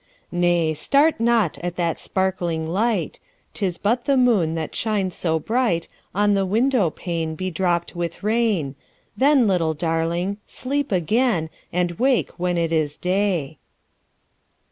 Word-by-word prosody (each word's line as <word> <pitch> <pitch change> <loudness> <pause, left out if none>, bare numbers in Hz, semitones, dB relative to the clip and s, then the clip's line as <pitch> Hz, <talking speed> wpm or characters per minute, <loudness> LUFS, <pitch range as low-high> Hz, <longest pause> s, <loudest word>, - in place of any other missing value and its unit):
10 175 - -3
Nay! 170 -2 +2
start 280 - +2
not 230 -7 +2
at 175 0 -4
that 170 -2 -1
sparkling 175 -4 -1
light; 215 +7 -1 0.3
'Tis 185 -4 -2
but 235 +4 0
the 280 -2 +3
moon 210 -11 +3
that 160 -2 -4
shines 205 -5 -1
so 160 -2 0
bright 185 -2 0 0.3
On 205 +1 +3
the 195 -1 +2
window 220 0 +2
pane 165 -1 -4
bedropped 175 0 -1
with 170 +1 -4
rain: 210 - +1 0.4
Then, 275 -2 +4
little 170 -6 +1
Darling! 170 +4 -1
sleep 280 +1 -2
again, 185 -1 +1 0.2
And 175 0 0
wake 260 0 +2
when 180 0 0
it 165 -1 0
is 155 -3 0
day. 180 -6 -1
180 Hz, 140 wpm, -22 LUFS, 165-225 Hz, 0.4 s, Then